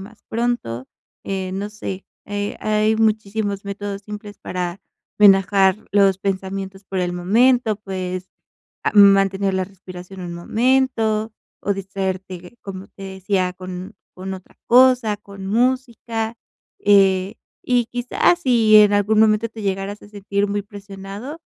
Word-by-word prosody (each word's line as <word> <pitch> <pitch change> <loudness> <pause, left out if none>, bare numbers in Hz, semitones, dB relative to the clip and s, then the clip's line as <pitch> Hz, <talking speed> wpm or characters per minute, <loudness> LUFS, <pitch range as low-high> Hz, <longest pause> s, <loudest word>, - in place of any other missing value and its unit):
más 210 +3 -13
pronto. 225 - -2 0.4
Eh, 190 -1 -3
no 200 +2 -3
sé, 195 -2 -7 0.2
eh, 205 0 -4
hay 215 +1 +2
muchísimos 215 -2 0
métodos 200 0 -5
simples 210 0 -9
para 180 0 -4 0.4
relajar 195 -1 +5 0.2
los 195 -2 +4
pensamientos 195 0 -4
por 190 -1 -3
el 175 -1 -1
momento, 220 +5 +3
puedes, 185 -2 -5 0.5
ah, - - +1
mantener 195 -1 +5
la 190 0 0
respiración 185 0 -11
un 175 -1 -6
momento, 225 +2 +1 0.3
o 200 - 0
distraerte, 190 0 -5
como 195 -1 -8
te 195 - -14
decía, 190 -1 -1
con 185 0 -8 0.2
con 190 +1 -5
otra 185 -1 -13
cosa, 250 -3 +5
con 200 -2 -10
música. 235 -1 -1 0.4
Eh, 195 -1 +4 0.3
y 245 -2 +2
quizás, 245 +8 +1
si 230 -6 +5
en 210 -1 +7
algún 205 +1 +2
momento 220 +1 +3
te 220 0 -10
llegaras 195 +1 -3
a - - -13
sentir 200 0 -2
muy 205 0 -1
presionado, 205 +7 -9
200 Hz, 135 wpm, -21 LUFS, 190-220 Hz, 0.5 s, en